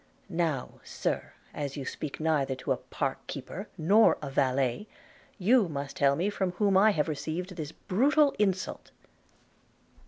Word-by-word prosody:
Now, 165 -7 -2
Sir, - - -3 0.2
as 145 -1 -4
you 135 - -4
speak 150 +1 -5
neither 150 -4 +1
to 130 - -4
a - - +2
park - - -3
keeper - - -6
nor 200 +8 +5
a 140 -2 -6
valet, 135 - +1 0.5
you 215 0 +4
must 140 0 -5
tell 140 -4 +4
me 185 +7 0
from 190 -3 -1
whom 200 +1 +2
I 200 +3 +6
have 155 -7 +1
received 165 +4 -4
this 155 -3 -5
brutal 280 - +2
insult.' 190 -2 -1
165 Hz, 150 wpm, -29 LUFS, 140-200 Hz, 0.5 s, I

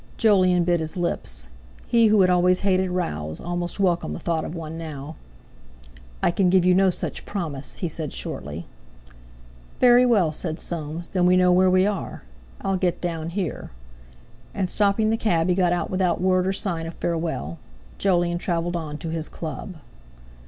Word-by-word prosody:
Jolyon 185 -5 +4
bit 175 0 +2
his 160 +2 -4
lips; - - -2 0.4
he 230 -1 +4
who 210 -1 +5
had 185 - +4
always 180 0 +3
hated 190 -1 +2
rows 80 - -3
almost 175 +2 -4
welcomed 175 - +1
the - - -6
thought 165 -2 -1
of 170 - -6
one 160 -1 -6
now. 155 -2 -7 1.1
"I - - +4
can 185 +1 +2
give 180 -1 +4
you 180 - +5
no 190 +1 +4
such 180 - -4
promise," 155 -9 -4
he 180 - -3
said 155 -2 -5
shortly. 75 +4 -5 1.1
"Very 245 0 +6
well," 200 -10 +3
said 160 +1 -4
Soames, 165 0 -5
"then 180 -2 +2
we 180 0 +5
know 180 0 +4
where 185 +1 +5
we 185 +1 +4
are. 205 -3 -3 0.4
I'll 195 -1 0
get 180 -2 0
down 165 -2 -3
here." 180 -1 -4 0.9
And 190 -3 -1
stopping 210 +1 +2
the 225 - +1
cab 175 -6 +1
he - - +4
got 180 -1 +2
out 175 - -1
without 185 -2 +1
word 185 0 +2
or 190 - +1
sign 170 -5 -2
of 165 - -8
farewell. 160 - -3 0.4
Jolyon 175 -3 +1
travelled 175 -1 -1
on 155 -3 -4
to 165 - -6
his 160 -1 -4
Club. 160 +3 -6
175 Hz, 175 wpm, -24 LUFS, 165-185 Hz, 1.1 s, Very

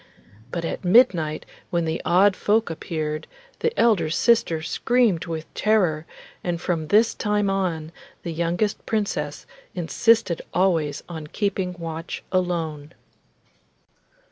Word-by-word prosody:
But 170 +5 -3
at - - -4
midnight, 175 -7 +3 0.2
when 170 -1 0
the 160 0 -2
odd 190 +3 +4
folk 215 -1 +1
appeared, 155 -1 -4 0.3
the 465 - +1
elder 200 -9 +3
sister 170 -4 +2
screamed 230 -2 +1
with 160 -1 -6
terror, 180 -8 +1 0.4
and 175 -1 -2
from 165 -3 -2
this 215 +7 +4
time 210 -2 0
on 170 -5 -2 0.3
the 170 - -4
youngest 170 +5 -1
Princess 215 -2 -2 0.3
insisted 185 +2 +2
always 170 -6 +1
on 160 -3 -7
keeping 190 0 -2
watch 165 0 -6
alone. 165 -4 -2
175 Hz, 115 wpm, -24 LUFS, 160-205 Hz, 0.4 s, odd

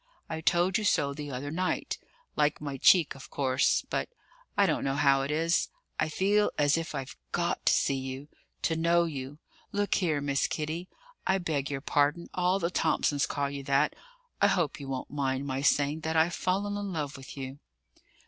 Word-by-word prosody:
I 160 -1 -4
told 175 +5 +3
you - - -3
so 140 -8 +2
the 145 0 -6
other 140 +2 -4
night; 185 +3 -1 0.4
like 150 0 +2
my 140 -2 -4
cheek, 170 +3 +5
of 135 -2 -12
course, 130 -1 +2
but - - -2 0.5
I - - +6
don't - - 0
know 135 0 0
how 140 -1 +4
it 135 - -3
is 165 +3 +1 0.3
I 155 - +1
feel 205 +5 +2
as 145 -1 +4
if 165 -2 -3
I'd 135 -2 -4 0.2
got - - -1
to - - +6
see 135 - +2
you, 130 +2 -6 0.4
to 165 - +1
know 170 +1 +3
you. 145 -3 -5 0.3
Look 205 0 0
here, 160 -6 +1
Miss 140 -1 +1
Kitty 160 +4 -3 0.4
I 190 - +4
beg 155 -6 -2
your 135 -1 -3
pardon, 145 +3 +1
all 180 +1 +2
the 175 -2 -1
Thomsons 145 -4 +1
call 140 -1 -1
you 140 -1 -5
that 140 +2 +2 0.5
I - - +7
hope 170 -6 0
you 140 - -7
won't 130 -1 -4
mind 135 -1 -1
my 135 -1 -2
saying 145 +2 +2
that 160 0 -2
I've 165 +2 +3
fallen 200 +2 0
in 200 -1 -4
love 150 -4 -3
with 135 +1 -10
you?" 135 +1 -6
150 Hz, 195 wpm, -29 LUFS, 140-170 Hz, 0.5 s, I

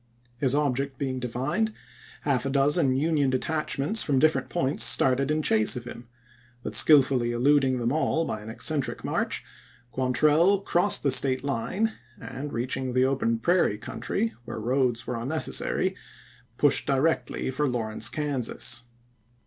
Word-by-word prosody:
His 135 -1 +1
object 140 -2 -1
is^ - - -34
being 130 -2 -3
divined, 130 - -2 0.5
half 135 -4 0
a - - -1
dozen 140 0 +3
Union 145 -1 +1
detachments 150 - -1
from 140 -3 0
different 140 -2 +2
points 135 -2 0
started 130 +2 +3
in 155 0 0
chase 110 -4 +2
of 125 - -5
him; 120 -1 -10 0.6
but - - -5
skillfully 130 -5 +5
eluding 130 +2 +2
them 120 0 -1
all 160 +2 0
by 110 - -4
an 105 - -9
eccentric 145 +5 -2
march, - - -2 0.5
Quantrell 155 +10 +2
crossed 195 +1 +1
the 140 - +2
State 130 0 +3
line, 165 - -1 0.3
and, 135 +3 -7
reaching 125 +2 -2
the 130 +1 +3
open 130 -4 0
prairie 170 - +1
country, 220 - -3
where 120 - -6
roads 120 0 0
were 125 - -4
unnecessary, 140 +7 -1 0.6
pushed - - +2
directly 135 -2 0
for 145 +3 -1
Lawrence, 110 -3 -1
Kansas. 145 -6 -1
135 Hz, 145 wpm, -26 LUFS, 125-150 Hz, 0.6 s, skillfully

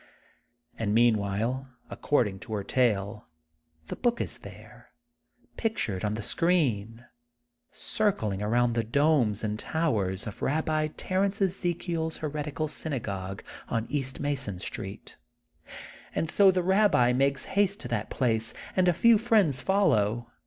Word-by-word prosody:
And 105 -2 0
meantime, 115 +3 +1 0.2
according 105 -9 0
to 110 - -8
her 100 -2 -2
tale, 105 -4 0 0.6
the - - -6
book 240 -1 0
is - - -3
there, - - -13 0.7
pictured 110 - -2
on 105 0 0
the 110 - -5
screen, 120 - 0 0.7
circling 110 - -1
around 120 +3 +2
the 115 -1 0
domes 120 -4 +2
and 105 0 -2
towers 110 - -1
of 105 - -7
Babbi 155 +1 0
Ter 185 +1 0
ence 200 +1 -3
EzekiePs 175 -4 -1
heretical 150 0 -3
synagogue 100 - -4 0.3
on 115 0 -1
east 135 -2 -2
Mason 135 -9 -2
Street. 95 +2 -7 1.0
And 160 - -1
so 200 -1 +6
the 185 -1 +2
Babbi 190 - +4
makes 135 +1 +1
haste 200 0 +2
to - - -6
that 110 -3 -2
place, 115 -3 0 0.2
and 185 -1 +3
a 175 - +5
few 230 +5 +5
friends 205 - +3
follow. 120 - +1
130 Hz, 130 wpm, -28 LUFS, 110-165 Hz, 1.0 s, so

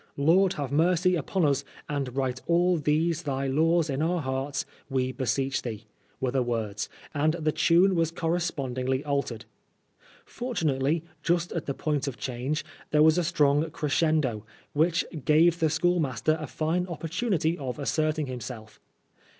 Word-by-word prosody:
" - - -37
Lord 175 +6 +4
have 140 -2 -4
mercy 180 +4 +3
upon 175 +2 0
us, 140 -1 +2 0.2
and 140 -4 -3
write 130 -2 -1
all 175 +1 +3
these 155 +2 +1
thy 140 -4 -2
laws 160 +4 +2
in 140 0 -2
our 175 +2 +1
hearts, 135 0 -2 0.2
we 130 -1 0
beseech 135 +2 -1
thee," 115 -2 -6 0.3
were 130 -1 0
the 135 0 +1
words, 110 -4 -2 0.2
and 155 +1 +2
the 155 -2 0
tune 175 +5 +4
was 165 -2 +2
correspondingly 140 -6 -1
altered. 140 -6 -2 0.8
Fortunately, 160 - -1 0.2
just 170 +1 0
at 170 - -4
the 140 - -2
point 150 -2 -1
of 130 -3 -4
change, 130 +5 -3 0.2
there 150 0 +4
was 160 +2 +5
a - - +3
siTong 155 -2 +2
creacendOy 150 -6 +1 0.3
which 165 +3 +2 0.2
gave 165 +3 +4
the 160 - +3
schoolmaster 155 -3 +1
a 155 - -4
fine 165 +5 -1
opportunity 170 0 -1
of 130 -3 -4
asserting 155 +3 0
himself. 120 -4 -8
150 Hz, 150 wpm, -27 LUFS, 135-165 Hz, 0.8 s, was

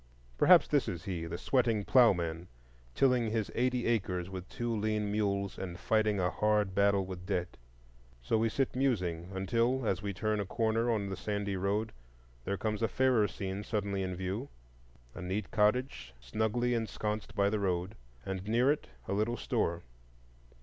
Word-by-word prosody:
Perhaps - - +6
this - - +2
is 85 -1 -4
he,—the 85 -4 -4
sweating 115 -5 +1
ploughman, 90 -9 +3 0.5
tilling 125 -4 +3
his 110 -2 -1
eighty 125 0 0
acres 95 -5 -1
with 95 -1 -7
two 120 -3 -2
lean 105 -1 -1
mules, 100 -2 -1
and 90 -2 -5
fighting 110 -1 +2
a 90 -1 +1
hard 105 -2 +1
battle 100 0 +3
with 90 -1 -8
debt. 90 -3 -2 0.7
So 110 - +1
we 115 +1 +2
sit 135 +3 -1
musing, 90 -11 0
until, 115 +7 0
as 95 -2 0
we 100 -1 -2
turn 105 +3 -1
a 100 - -1
corner 115 +1 +1
on 105 -4 0
the 95 - -3
sandy 100 0 -2
road, 100 +4 -1 0.5
there 100 +1 -1
comes 105 0 -2
a 115 - +3
fairer 125 -1 +3
scene 95 0 -5
suddenly 100 -2 -2
in 95 -1 -2
view,—a - - -8
neat 95 +2 -3
cottage 105 - +1
snugly 110 - 0
ensconced 110 -2 -3
by 100 0 +2
the 105 - 0
road, 95 0 -1 0.3
and 95 0 -4
near 120 +5 +4
it 150 - -2 0.2
a - - -1
little 110 +4 0
store. 85 -3 -1
100 Hz, 165 wpm, -32 LUFS, 95-115 Hz, 0.7 s, Perhaps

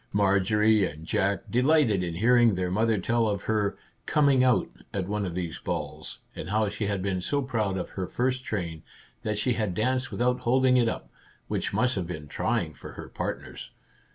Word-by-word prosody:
Marjorie 105 +2 +3
and 80 -3 -4
Jack 100 +4 0
delighted 125 - +3
in 85 -2 -3
hearing 115 +2 +4
their 90 0 -1
mother 110 +3 +2
tell 115 +4 +1
of 100 -1 -1
her 105 -2 0
" - - -41
coming 140 -4 +4
out 125 -1 +3 0.2
" - - -36
at 95 -2 -1
one 105 -1 -1
of 85 - -5
these 85 -3 -3
balls, - - -4
and 80 - -6
how 105 0 +2
she 105 0 -3
had 100 -2 -1
been 95 -2 -1
so 140 +9 0
proud 110 -7 -1
of 90 - -4
her 95 -2 -4
first 130 +1 -1
train 85 -9 -3 0.4
that 105 -1 -2
she 125 +4 +1
had 110 -5 -1
danced 130 +4 0
without 125 +1 +1
holding 130 +1 +3
it 120 -2 +4
up, - - -6 0.4
which - - -1
must 125 0 +2
have 95 -6 -2
been 80 -4 -6
trying - - -1
for - - -10
her - - -9
partners. - - -5
105 Hz, 200 wpm, -27 LUFS, 95-125 Hz, 0.4 s, hearing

